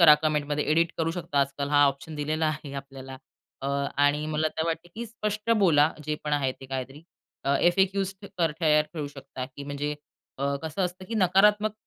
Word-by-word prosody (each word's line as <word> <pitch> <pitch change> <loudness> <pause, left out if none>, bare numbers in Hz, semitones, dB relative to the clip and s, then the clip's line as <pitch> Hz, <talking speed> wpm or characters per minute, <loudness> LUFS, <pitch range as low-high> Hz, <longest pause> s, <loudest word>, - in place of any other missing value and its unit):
करा 155 -3 +10
कमेंटमध्ये. 150 -1 0
एडिट 165 +1 +3
करू 165 0 +1
शकता 170 -5 -2
आजकाल. 140 +1 -1
हा 145 0 +6
ऑप्शन 140 +3 -3
दिलेला 155 +2 0
आहे 150 -2 -3
आपल्याला. 135 -1 -8 0.5
अ, 135 - -2 0.3
आणि 145 +1 +3
मला 155 0 0
तर 160 - +1
वाटते 165 +1 -3
की 235 +1 -5
स्पष्ट 215 -1 -3
बोला, 160 -6 +5
जे 150 - -1
पण 150 - -2
आहे 135 -3 +1
ते 135 - -9
काहीतरी. 135 +2 -5 0.4
अ, 140 +1 +3
एफ-ए-क्युज 190 +2 +2 0.2
तर 165 -3 +2
तयार 150 -1 +4
ठेवू 150 -2 -3
शकता 135 -2 -7
की 140 - -6
म्हणजे 145 +1 -3 0.4
अ, 140 - -1 0.2
कसं 160 +4 -2
असतं 180 +1 -5
की 230 - -3
नकारात्मक 210 +2 +4
150 Hz, 185 wpm, -27 LUFS, 145-175 Hz, 0.5 s, करा